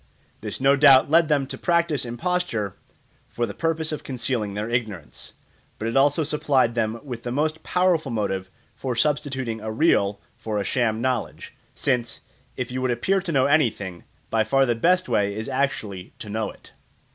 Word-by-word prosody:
This - - -6
no 135 +1 +5
doubt 140 -1 +6
led 165 -1 +5
them 145 -3 +2
to - - -7
practise 170 -5 +1
imposture 120 - -2 0.6
for 120 - -1
the 100 - -6
purpose 160 -1 -1
of 155 - -4
concealing 120 -5 -2
their 105 +1 -2
ignorance; 110 -9 -4 0.4
but 110 - -3
it 115 - -2
also 145 +3 +4
supplied 140 -5 +1
them 115 0 -1
with 125 -5 -6
the 120 - -4
most 155 +4 -1
powerful 180 -5 +1
motive 95 -4 -2 0.2
for 130 -2 -4
substituting 135 -4 -1
a 110 0 -4
real 105 -6 +2 0.2
for 110 -4 -2
a - - -1
sham 115 +1 0
knowledge, 125 -3 -2 0.2
since, 120 -4 -1 0.4
if 125 0 -3
you 130 +1 -3
would 130 - 0
appear 190 +12 +1
to 180 -2 -4
know 135 -4 +3
anything, 115 - +1 0.3
by 110 -1 +3
far 135 +5 +3
the 120 - +2
best 180 +10 +2
way 100 -4 +1
is 110 +1 -4
actually 130 -9 -2
to 105 - -8
know 110 +1 -2
it. - - -14
125 Hz, 180 wpm, -24 LUFS, 110-145 Hz, 0.6 s, doubt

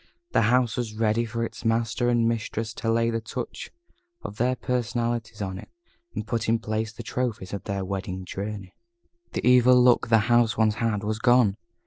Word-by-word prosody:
The 110 - +3
house 125 -2 +2
was 115 -3 -3
ready 115 +1 +1
for 115 +1 -2
its - - -9
master 115 +1 +1
and 120 -1 +3
mistress 115 -1 -2
to 115 0 -2
lay 115 0 +2
the 115 0 -2
touch 120 +3 -6 0.5
of 105 - -7
their 125 +2 +1
personality 120 -3 -2
on 95 0 -6
it, - - -12 0.5
and - - -3
put 115 -2 -2
in 115 - +4
place 110 0 -3
the 120 - -9
trophies 110 -6 -3
of 100 - -5
their 100 -2 -3
Wedding 95 -1 -4
Journey. 100 0 -6 0.6
The - - -2
evil 125 0 +6
look 125 -1 +4
the 115 -1 +5
house 120 -1 +3
once 110 -1 +3
had 110 -3 0
was 110 +1 -2
gone. 120 -4 +4
115 Hz, 185 wpm, -25 LUFS, 105-120 Hz, 0.6 s, evil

